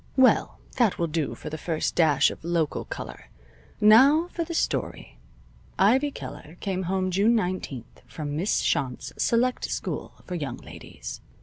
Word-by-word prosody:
Well, 260 -1 +4 0.2
that 235 -6 +3
will 170 - +1
do 160 -2 -2
for 155 - -8
the 155 - -5
firsh 160 -1 -1
dash 150 -5 +4
of - - -11
local 165 -3 -1
color. - - -8 0.5
Now 275 +11 +6
for 340 - -3
the 335 0 -5
story. - - -2 0.6
Ivy 255 +9 +4
Keller 165 - -9
came 190 -2 -2
home 185 -1 0
June 205 +6 +3
nineteenth 180 - -3
from 145 -2 -5
Miss 180 +7 +1
Shont's 130 -3 -1
select 245 +2 +1
school - - -4
for 180 - -6
young 145 -8 -3
ladies. - - -9
185 Hz, 150 wpm, -26 LUFS, 155-235 Hz, 0.6 s, Now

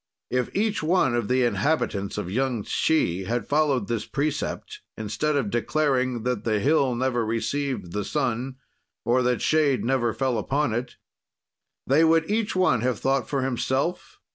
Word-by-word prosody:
If 125 0 0
each 215 +1 0
one 160 -6 +2
of 120 -3 0
the 125 0 +2
inhabitants 120 -6 0
of 90 - -4
Yung 125 -1 0
Tshi 95 - +1
had 115 +1 -2
followed 145 -7 +1
this 115 -2 -2
precept, 155 - -3 0.2
instead 110 +8 -1
of 125 -8 0
declaring 130 -1 0
that 125 -4 -1
the 110 -2 +1
hill 135 0 +2
never 120 -1 0
received 115 -2 -2
the 105 +2 -2
sun 130 0 -2 0.5
or 120 +2 +3
that 125 -1 0
shade 150 -6 +2
never 120 -2 +1
fell 120 +1 -1
upon 140 +3 0
it, 120 +2 -3 0.9
they 145 +5 +4
would 165 +3 +3
each 215 -2 0
one 185 -11 +3
have 125 -1 0
thought 135 +4 0
for 135 -2 0
himself. 130 +6 -2
130 Hz, 160 wpm, -25 LUFS, 120-150 Hz, 0.9 s, they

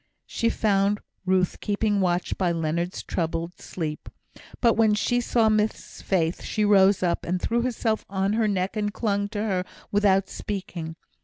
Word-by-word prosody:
She 230 - 0
found 205 -2 +2 0.3
Ruth 185 -1 +2
keeping 205 -1 0
watch 175 -1 0
by 180 -3 +1
Leonard's 170 +2 -2
troubled 165 +1 -3
sleep; 155 -4 -5 0.5
but 235 -2 +4
when 220 -1 +3
she 245 +3 +1
saw 230 -1 +2
Miss 215 0 -1
Faith 170 -3 0
she 215 - -1
rose 195 -2 +5
up, 175 -1 0
and 180 +1 -1
threw 235 +5 0
herself 230 -3 -1
on 195 +1 0
her 220 0 +2
neck 190 -1 -1
and 205 -1 -1
clung 205 -2 -1
to 210 -1 -4
her, 190 -4 0 0.3
without 195 -2 +3
speaking. 180 -5 -5
200 Hz, 160 wpm, -25 LUFS, 180-215 Hz, 0.5 s, rose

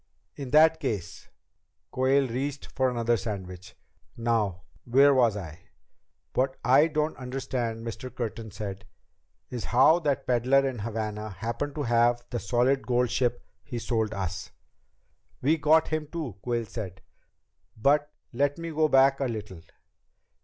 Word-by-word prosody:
"In 140 -3 -6
that 160 +3 +5
case 105 - -4 0.3
" - - -51
Quayle 135 +1 +2
reached 135 +4 -3
for 130 0 0
another 120 -1 +1
sandwich. 95 -4 -7 0.4
"Now 110 -6 0 0.2
where 140 +4 +5
was 120 -5 +3
I?" 80 -5 -8 0.7
"What 130 +1 0
I 135 +6 +6
don't 155 0 -1
understand," 125 -3 -4
Mr. 125 +3 -6
Curtin 115 -1 -5
said, 100 -2 -7 0.7
"is 120 -2 -4
how 145 +7 +5
that 145 -5 -1
peddler 130 +3 +3
in 130 -3 -4
Havana 105 -1 -4
happened 115 +9 -4
to 150 - -2
have 120 0 +2
the 120 - -2
solid 125 +4 +1
gold 125 -1 +1
ship 120 -2 0 0.2
he 120 - -6
sold 110 -2 -1
us." 85 -5 -4 0.9
"We 155 +5 +2
got 155 +2 +4
him, 155 -1 -2
too," 145 - -5
Quayle 120 -2 -1
said. 95 -4 -7 0.8
"But 145 +5 +2 0.2
let 145 +4 +1
me 165 0 -5
go 155 0 +2
back 135 -1 +4
a 135 - 0
little. 105 -7 -5
120 Hz, 145 wpm, -27 LUFS, 110-140 Hz, 0.9 s, I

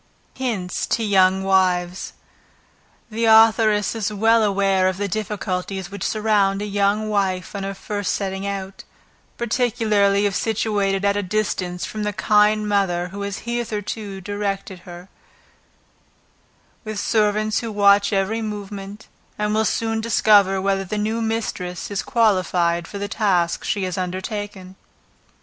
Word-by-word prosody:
Hints 215 -9 -3
to 230 - 0
Young 190 -2 +3
Wives. 185 -1 +1 1.0
The 230 +2 -1
authoress 220 -2 +5
is 215 -2 -2
well 225 +2 +3
aware 195 -2 +2
of 185 - -4
the 205 +1 -2
difficulties 195 -2 -3
which 200 - -6
surround 210 -3 +1
a 205 - -3
young 205 +1 0
wife 190 -4 -1
on 200 - -3
her 195 0 -4
first 205 0 -3
setting 195 0 -3
out, 195 -1 -5 0.5
particularly 215 -4 +1
if 200 - 0
situated 205 -3 0
at 200 0 +2
a - - +1
distance 185 -3 -2
from 215 - -6
the 210 0 -1
kind 210 +2 +3
mother 180 -4 0
who 200 +2 -7
has 200 +2 -5
hitherto 215 -4 -4
directed 200 -1 -4
her, 175 +1 -10 1.8
with 215 -2 -5
servants 215 0 +1
who 230 -2 -5
watch 200 0 +4
every 200 +3 0
movement, 205 -1 -7 0.3
and 210 0 -1
who 215 - +1
will 220 - +2
soon 225 +1 -1
discover 205 -4 +4
whether 195 0 0
the 200 +3 -4
new 220 +2 -1
mistress 215 -6 -3
is 200 - -1
qualified 180 -7 +1
for 200 - -7
the 200 0 -3
task 185 -5 0
she 200 - -1
has 185 0 -3
undertaken. 190 +1 -5
200 Hz, 140 wpm, -21 LUFS, 190-215 Hz, 1.8 s, authoress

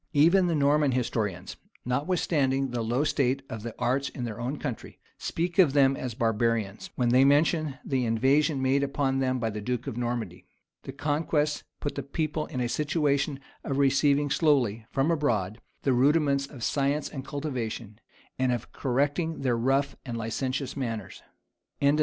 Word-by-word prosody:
Even 170 +5 +5
the 170 - +1
Norman 145 -1 +3
historians, 105 -7 -2 0.3
notwithstanding 135 -1 0
the 120 -1 -2
low 120 +5 0
state 135 -2 +1
of 110 - -5
the 115 0 -6
arts 130 +3 0
in 125 - -6
their 115 -2 -5
own 130 +5 -2
country, 125 - -6 0.2
speak 175 +2 -2
of 160 -8 +6
them 135 -1 +4
as 125 -4 -5
barbarians, 115 -3 0
when 125 -2 +1
they 130 +2 +5
mention 145 0 +3
the 130 -2 0
invasion 135 +5 +2
made 135 +2 +3
upon 135 -1 0
them 130 -1 +1
by 115 -2 -1
the 105 0 -5
duke 125 +2 -2
of 115 - -5
Normandy.[] 120 -7 -3 0.3
The - - -7
conquest 150 0 -1
put 145 - -3
the - - -3
people 155 +1 -2
in 130 -5 -4
a 120 - 0
situation 145 0 0 0.2
of 135 - -2
receiving 140 +1 +3
slowly, 120 - +2
from 140 +5 +1
abroad, 115 - 0 0.2
the 135 - +3
rudiments 140 +1 +3
of 135 -5 -10
science 140 +1 0
and 135 -3 -7
cultivation, 120 -7 -5 0.4
and 130 -1 +2
of 120 -2 -3
correcting 145 +5 -1
their 125 -3 +1
rough 135 +4 +1
and 120 -2 -5
licentious 130 +4 -3
manners. 115 -7 -4 0.3
[* - - -55
LL. 140 - +4
Ælf. 150 +2 +2
135 Hz, 170 wpm, -27 LUFS, 120-145 Hz, 0.4 s, of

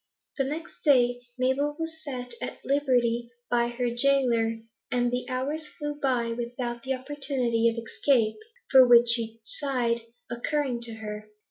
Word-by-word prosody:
The 270 - +2
next 315 +5 -6
day 245 -4 +4 0.2
Mabel 265 +3 +1
was 325 -1 -6
set 250 -4 -3
at - - -6
liberty 245 -4 +1 0.2
by 235 -1 +3
her 240 0 -2
gaoler, 240 -3 +2 0.3
and 245 -1 +1
the 250 +1 -3
hours 285 +5 -2
flew 295 -1 -3
by 260 -5 0
without 240 0 -4
the 265 +2 -1
opportunity 255 -4 0
of 230 - -5
escape, 230 - +1 0.3
for 260 -2 +8
which 240 0 +7
she 230 -1 -1
sighed, 240 -2 0 0.3
occurring 245 +1 -1
to 230 - -7
her. 215 -1 -7
245 Hz, 145 wpm, -27 LUFS, 235-275 Hz, 0.3 s, for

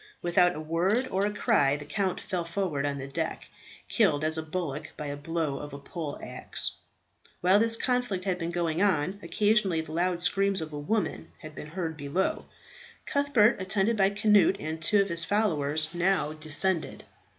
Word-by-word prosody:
Without 175 0 +4
a - - -5
word 180 +11 0
or 195 +2 +1
a - - -2
cry 205 - +2
the 145 - -9
count 190 +3 -1
fell 180 -4 -3
forward 170 -5 -2
on 140 -1 -2
the 135 0 -6
deck, 135 - -4 0.4
killed 145 +1 +2
as 160 0 0
a 160 - -2
bullock 155 -2 -4
by 150 - -5
a 145 0 -4
blow 150 -1 -2
of 145 -1 -8
a - - -6
pole 150 0 -6
axe. - - -3 0.7
While 185 +3 +5
this 230 +1 +2
conflict 245 -8 -1
had 185 -2 0
been 165 -1 -2
going 170 -1 -1
on, 185 -1 +1
occasionally 205 -7 +2
the 160 -1 -10
loud 175 +2 0
screams 195 +2 +2
of 155 -1 -6
a 145 - -4
woman 210 +9 -2
had 155 -1 -9
been 150 - -8
heard 165 -1 -4
below. 145 +6 -1 0.6
Cuthbert, 275 -8 +3
attended 195 +4 +1
by 195 -2 +4
Cnut 210 -3 +4
and 160 +1 -5
two 200 +4 +4
of 195 - -7
his 170 0 +1
followers, 155 -7 +1
now 175 -3 +1
descended. 155 +3 0
175 Hz, 185 wpm, -28 LUFS, 155-200 Hz, 0.7 s, While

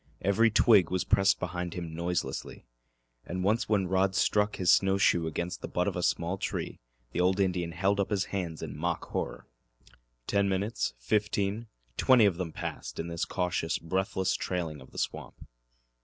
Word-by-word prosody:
Every 100 +4 +4
twig 105 -5 +5
was 90 -1 0
pressed 95 0 +3
behind 90 -1 -4
him 85 -3 -5
noiselessly, 85 -5 -3 0.6
and 90 +1 -4
once 110 +4 +1
when 100 -3 +2
Rod 95 +1 +1
struck 105 +1 +2
his 90 -2 +4
snow 95 0 +3
shoe 85 -4 +3
against 85 +3 -4
the - - -4
butt - - -1
of - - -1
a - - -1
small 85 +3 0
tree - - -4 0.3
the 90 - -1
old 95 +2 +2
Indian 90 -3 0
held 95 +4 +1
up 100 - +1
his 100 -2 0
hands 85 -5 -3
in 75 -4 -6
mock 85 +3 -2
horror. - - -4 0.8
Ten 100 -1 +1
minutes, 95 - -1
fifteen 105 - -1 0.3
twenty 125 -4 +6
of 95 -4 +2
them 90 -3 -3
passed - - -6
in 85 - -3
this 85 0 -2
cautious, 90 -3 -1
breathless 95 +2 -1
trailing 80 -6 -3
of 65 - -14
the - - -14
swamp. - - -3
95 Hz, 175 wpm, -29 LUFS, 85-100 Hz, 0.8 s, twenty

